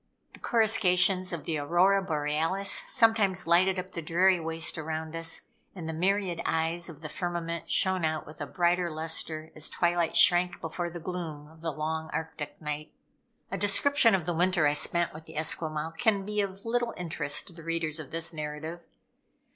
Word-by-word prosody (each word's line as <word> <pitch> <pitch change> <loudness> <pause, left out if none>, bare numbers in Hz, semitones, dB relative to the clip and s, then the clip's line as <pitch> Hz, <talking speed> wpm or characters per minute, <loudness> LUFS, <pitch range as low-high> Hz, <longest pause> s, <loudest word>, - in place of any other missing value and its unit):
The - - -14
coruscations 185 -5 +4
of 170 -4 -4
the 160 -3 -2
Aurora 180 +7 +3
Borealis 165 +3 0
sometimes 225 -7 +3
lighted 185 +3 +3
up 185 +1 -5
the 170 - -5
dreary 180 +3 +3
waste 165 +1 -1
around 160 +1 -4
us, 165 0 0 0.3
and 170 -4 -6
the 160 - -3
myriad 185 +1 0
eyes 165 +2 0
of 160 -2 -11
the 155 - -5
firmament 170 -1 -4
shone 190 -2 +3
out 155 -1 -1
with 155 +1 -12
a 145 - -3
brighter 175 +1 +1
lustre, 160 0 -4
as 155 - -3
twilight 175 -1 +1
shrank 175 0 +5
before 175 +2 -4
the 170 +1 -7
gloom 160 -4 -5
of 160 +1 -18
the 165 -1 -2
long 160 +1 -3
Arctic 160 -1 -5
night. 150 0 -5 0.6
A - - -3
description 230 +2 +4
of 180 -4 -2
the 175 - -1
winter 175 -1 +2
I 145 - +4
spent 170 +3 +1
with 155 +1 -11
the 160 -1 -11
Esquimaux 155 0 -1
can 215 -5 +2
be 210 0 0
of 195 +1 -5
little 240 0 -1
interest 160 -4 -1
to - - -10
the 165 - -12
readers 165 -1 -2
of 155 - -8
this 165 +1 -3
narrative. 155 +2 -6
170 Hz, 180 wpm, -28 LUFS, 160-185 Hz, 0.6 s, shrank